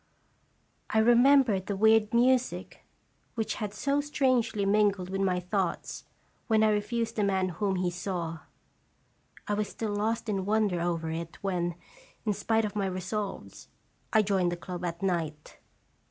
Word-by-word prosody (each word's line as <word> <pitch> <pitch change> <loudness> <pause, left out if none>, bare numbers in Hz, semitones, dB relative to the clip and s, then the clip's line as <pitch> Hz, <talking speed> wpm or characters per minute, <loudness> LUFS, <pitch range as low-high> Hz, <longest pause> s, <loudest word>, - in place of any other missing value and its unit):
I - - 0
remembered 240 -3 +5
the 200 - -1
weird 220 0 +4
music 250 +1 +1 0.5
which 225 -2 -1
had 210 -2 -2
so 280 +7 0
strangely 255 -8 +1
mingled 200 -2 +2
with 195 0 -1
my 185 -2 +1
thoughts 180 0 -3 0.4
when 220 -1 +3
I 215 - +4
refused 225 +3 -1
the 210 - +2
man 190 -2 +1
whom 190 +3 -1
he 180 -1 0
saw. 175 -3 -4 1.1
I 210 - 0
was 210 0 0
still 220 -2 -4
lost 225 +3 -1
in 195 -3 -1
wonder 205 -3 +1
over 165 -2 -1
it 165 0 -5
when, 175 -3 -1 0.5
in 210 - +1
spite 225 +2 +1
of 210 - -5
my 200 -2 0
resolves, 190 +2 -5 0.4
I 220 -1 +4
joined 190 -3 +1
the 175 - -3
club 180 0 -7
at 170 +1 -4
night. 160 -5 -3
200 Hz, 155 wpm, -29 LUFS, 180-220 Hz, 1.1 s, remembered